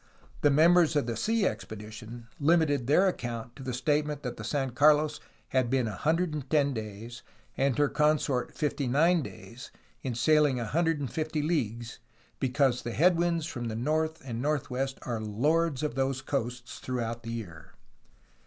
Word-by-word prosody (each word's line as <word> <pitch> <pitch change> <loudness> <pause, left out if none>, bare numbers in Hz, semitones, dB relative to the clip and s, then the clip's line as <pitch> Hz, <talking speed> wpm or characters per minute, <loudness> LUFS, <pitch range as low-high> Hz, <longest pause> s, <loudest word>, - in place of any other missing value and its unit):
The 145 - +5
members 165 +3 +5
of 145 - +2
the 115 -1 -3
sea 220 - +1
expedition 110 - -6
limited 145 -4 +2
their 180 +7 +5
account 120 -8 -4
to - - -11
the 130 -1 -4
statement 150 +3 0
that 125 -2 -4
the 105 - -8
San 135 +3 -1
Carlos 150 +3 +4 0.3
had 130 -2 +1
been 130 -1 +1
110 150 - 0
days 110 +1 -7 0.3
and 135 -2 +1
her 145 0 +4
consort 150 -4 +1
59 150 +4 +1
days, 130 -2 -10 0.3
in 125 -3 -3
sail 150 +5 +4
ing 130 -3 -1
150 155 +3 -1
leagues, 120 -7 -2 0.4
because 130 -1 +1
the 120 - -5
headwinds 170 0 +2
from 120 -6 -5
the 110 -1 -3
north 155 +6 0
and 120 -2 -4
north 145 -2 -1
west 135 +1 -2
are 115 -3 -3
lords 145 +8 +1
of 150 - -1
those 135 0 -1
coasts 125 -3 -4
throughout 120 -2 -3
the 115 0 -6
year. 90 -9 -8
135 Hz, 155 wpm, -29 LUFS, 120-155 Hz, 0.4 s, The